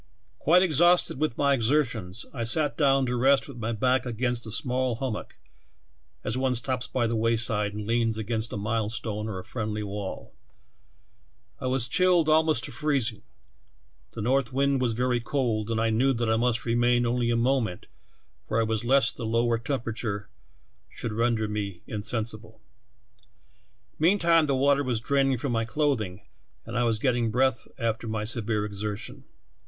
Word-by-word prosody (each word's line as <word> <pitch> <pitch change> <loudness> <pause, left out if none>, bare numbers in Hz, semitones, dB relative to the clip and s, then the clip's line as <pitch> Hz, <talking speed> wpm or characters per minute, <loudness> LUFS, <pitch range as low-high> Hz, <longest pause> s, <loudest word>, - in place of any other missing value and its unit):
"Quite 180 +4 +5
exhausted 175 -2 +3
with 155 -6 -1
my 140 -1 +3
exertions, 120 -6 0
I 120 -4 -3
sat 145 +6 +3
down 135 -3 +3
to 125 0 -1
rest 135 +3 +3
with 135 -3 -10
my 115 0 -3
back 125 +3 +1
against 120 -1 -2
a - - -6
small 125 +1 0
hum 130 0 -3
mock, - - -8 0.9
as 110 - -2
one 130 0 0
stops 125 +1 -1
by 125 -2 0
the 115 0 -1
wayside 110 -2 0
and 105 0 -5
leans 115 0 +1
against 110 +1 -2
a - - -4
milestone 110 0 -2
or 105 -4 -4
a 90 - -6
friendly 105 -1 -4
wall. 100 -1 -6 1.3
I 130 - -3
was 130 -2 +2
chilled 175 +2 +3
almost 155 -5 +3
to - - -3
freezing, 130 -5 0 0.9
the 110 - -5
north 130 +1 +1
wind 135 0 +1
was 120 -3 +1
very 125 +1 0
cold, 115 -4 -1
and 115 -1 0
I 115 0 +1
knew 130 +5 +2
that 115 -2 -1
I - - +3
must 120 +1 +1
remain 120 +1 +2
only 120 0 0
a 120 - +2
moment 115 -6 0 0.6
where 110 - 0
I - - +3
was 110 0 -1
lest 130 +1 +2
the 115 - -4
low 115 +1 +2
temperature 115 -4 -3 0.6
should 115 - -5
render 115 -1 +1
me 100 -4 -4
insensible. 110 0 -5 1.4
Meantime 170 -2 +4
the 140 - +1
water 140 +1 +3
was 125 -4 0
draining 135 +2 +1
from 135 +2 -3
my 115 -1 0
clothing 110 -7 -1 0.4
and - - -7
I 120 0 +2
was 115 -2 +1
getting 120 -1 +1
breath 125 0 +1
after 115 0 -2
my 110 -1 -2
severe 110 -1 -1
exertion. 105 0 -5
120 Hz, 170 wpm, -26 LUFS, 110-130 Hz, 1.4 s, Quite